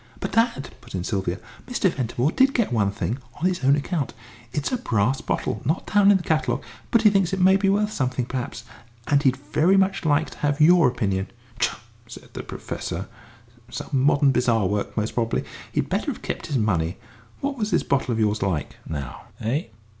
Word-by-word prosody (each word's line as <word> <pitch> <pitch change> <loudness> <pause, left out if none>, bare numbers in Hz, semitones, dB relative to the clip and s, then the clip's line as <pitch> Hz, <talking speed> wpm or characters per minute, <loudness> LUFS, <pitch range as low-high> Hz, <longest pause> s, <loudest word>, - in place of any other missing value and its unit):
"But, - - -4
dad," 225 - +1
put - - -9
in 90 - -2
Sylvia, 95 -2 -1 0.3
"Mr. 245 -5 +1
Ventimore 130 +2 -1
did 270 +5 +3
get 230 - +1
one 105 -4 +2
thing 115 +5 -3 0.2
on 165 - -3
his 180 -6 0
own 135 +2 +5
account. 145 -2 -2 0.4
It's 145 +3 -2
a 255 - +1
brass 125 - 0
bottle, 105 - -2
not 155 +8 -1
down 205 -1 +6
in 205 - +7
the 180 - -7
catalogue, 160 -1 0 0.3
but 230 -1 +3
he 210 - +7
thinks 195 -2 +2
it 190 - 0
may 190 +1 +6
be 195 0 +2
worth 210 +2 +2
something 130 -2 -1
perhaps. 125 -2 -4 0.4
And 145 -1 +3
he'd 130 -3 +3
very 155 +7 +2
much 195 0 +2
like 155 0 +2
to - - -13
have 145 0 0
your 170 +1 +6
opinion." 100 -6 -1 0.3
"Tchah!" 120 - +1 0.3
said - - -11
the - - -5
Professor. - - -5 0.6
"Some - - -6
modern 140 +1 +4
bazaar 115 -5 +2
work, 100 +4 -2
most 110 +1 -1
probably. 115 -1 0 0.3
He'd - - 0
better - - -1
have - - -4
kept - - -4
his 140 - 0
money. 90 -6 0 0.4
What 280 0 -1
was 215 -4 -2
this 175 - +2
bottle 135 -2 0
of 115 - -1
yours 105 -1 +1
like, 90 -7 -2
now, 70 -4 -6
eh?" 130 +9 -1
140 Hz, 200 wpm, -24 LUFS, 115-185 Hz, 0.6 s, in